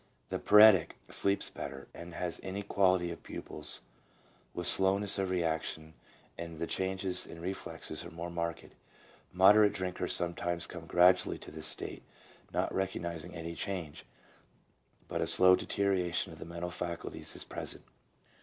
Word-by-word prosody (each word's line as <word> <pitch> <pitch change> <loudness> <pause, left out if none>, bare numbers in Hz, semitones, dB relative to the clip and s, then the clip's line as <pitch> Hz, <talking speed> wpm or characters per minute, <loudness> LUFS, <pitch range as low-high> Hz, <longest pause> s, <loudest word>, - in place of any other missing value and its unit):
The - - -2
paretic 105 -5 +7 0.2
sleeps 100 0 +1
better, 70 0 -7
has 85 0 -4
inequality 95 -2 +1
of 85 - -8
pupils 75 -1 -7 0.7
with 90 - -4
slowness 100 +2 +4
of 95 -1 0
reaction, 80 -2 -2 0.5
and 85 -1 -6
the 85 - -2
changes 95 0 -1
in 85 - -10
reflexes 90 -3 -5
are 85 - -8
more 85 +1 -6
marked. 85 -1 -3 0.7
Moderate 100 +3 +6
drinkers 90 -1 -2
sometimes 85 0 -1
come 85 -2 -9
gradually 90 +2 +4
to - - -11
this 80 0 -4
state, - - -3 0.5
not - - -1
recognizing 85 -3 -3
any 85 0 -5
change, 85 -5 -5 1.0
but - - -2
a - - 0
slow 90 0 +7
deterioration 95 -3 0
of - - -13
the - - -7
mental 85 +1 -5
faculties 85 -1 -5
is - - -5
present. - - -5
90 Hz, 135 wpm, -32 LUFS, 85-95 Hz, 1.0 s, paretic